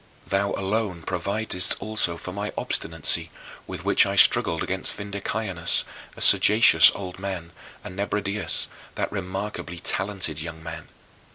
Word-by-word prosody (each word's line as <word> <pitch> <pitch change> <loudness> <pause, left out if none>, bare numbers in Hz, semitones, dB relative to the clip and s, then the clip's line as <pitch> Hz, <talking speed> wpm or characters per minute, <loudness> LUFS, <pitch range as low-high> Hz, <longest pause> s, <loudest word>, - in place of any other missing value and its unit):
thou 100 +1 0
alone 95 -3 -2
providedst 90 +1 +1
also 105 -6 0
for 90 - -7
my 100 +1 -4
obstinacy - - -1 0.4
with - - -7
which - - +5
I - - -2
struggled 80 - +4
against 95 0 -3
Vindicianus, 100 -3 -2 0.3
a - - -9
sagacious 105 -7 +7
old 95 -2 -7
man, 95 -4 -5 0.3
and 90 - -9
Nebridius, 100 0 -2 0.3
that - - -2
remarkably 95 -2 -5
talented 90 -4 -1
young 80 0 -8
man. 80 -2 -8
95 Hz, 125 wpm, -24 LUFS, 85-100 Hz, 0.4 s, sagacious